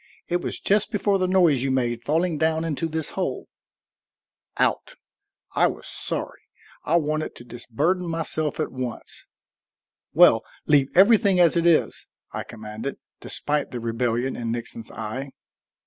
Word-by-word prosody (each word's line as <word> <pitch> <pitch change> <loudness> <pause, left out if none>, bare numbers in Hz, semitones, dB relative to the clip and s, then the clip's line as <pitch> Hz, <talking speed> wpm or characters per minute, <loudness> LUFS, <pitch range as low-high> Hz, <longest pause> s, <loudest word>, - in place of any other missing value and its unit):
It 175 0 0
was - - -4
just 205 +1 +2
before 200 -1 +1
the 185 - +1
noise 175 -8 +4
you 135 - 0
made 120 -3 0
falling 160 +5 0
down 160 0 +1
into 165 0 -2
this 160 -1 -3
hole." - - -3 1.1
Out! - - 0 0.6
I - - +4
was - - -6
sorry; - - -4 0.4
I 160 - +1
wanted 155 -1 0
to - - -11
disburden 135 +10 -2
myself 160 -2 -2
at 155 - -1
once. 125 -3 -7 0.8
"Well, - - +6 0.2
leave 140 -2 +4
everything 200 -1 +6
as 170 -2 +5
it 170 0 +2
is," 165 -2 +2 0.2
I - - -4
commanded, 110 +4 -7 0.2
despite 145 0 -2
the 125 - -5
rebellion 120 +2 -1
in 115 -1 -3
Nixon's 115 -1 -6
eye. 130 +5 -6
150 Hz, 145 wpm, -24 LUFS, 120-170 Hz, 1.1 s, Well